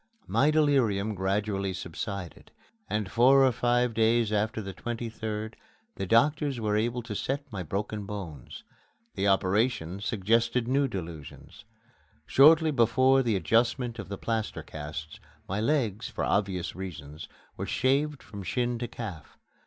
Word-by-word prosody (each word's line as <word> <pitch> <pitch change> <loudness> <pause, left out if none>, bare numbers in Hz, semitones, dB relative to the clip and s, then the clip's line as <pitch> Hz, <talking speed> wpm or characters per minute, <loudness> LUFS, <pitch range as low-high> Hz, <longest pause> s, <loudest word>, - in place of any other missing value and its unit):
My 145 - +3
delirium 130 -10 +2
gradually 100 0 -1
subsided, 90 +1 -6 0.4
and 105 -3 -2
four 135 +3 +6
or 130 - +4
five 120 0 +1
days 115 0 +2
after 110 +1 0
the 95 -2 -6
23d 110 -1 -4 0.4
the 95 - -4
doctors 140 - +2
were 105 -2 0
able 120 +3 0
to 115 -2 -6
set 135 +7 -2
my 100 -4 -4
broken 100 +4 -4
bones. 90 - -7 0.5
The 100 +1 0
operation 95 -1 +1
suggested 115 +3 +1
new 135 +2 +2
delusions. 85 - -8 0.6
Shortly 155 +3 +6
before 130 +2 +4
the 115 -5 +1
adjustment 120 +4 +1
of - - -7
the 100 - -4
plaster 110 0 -3
casts, 75 0 -7 0.3
my 95 +2 -2
legs, 115 -5 0
for - - -4
obvious 95 -4 0
reasons, 80 -5 -7 0.3
were - - -5
shaved 140 +3 +1
from 100 -1 -9
shin 120 +4 -1
to 120 - -3
calf. 105 -10 -8
110 Hz, 135 wpm, -28 LUFS, 95-120 Hz, 0.6 s, four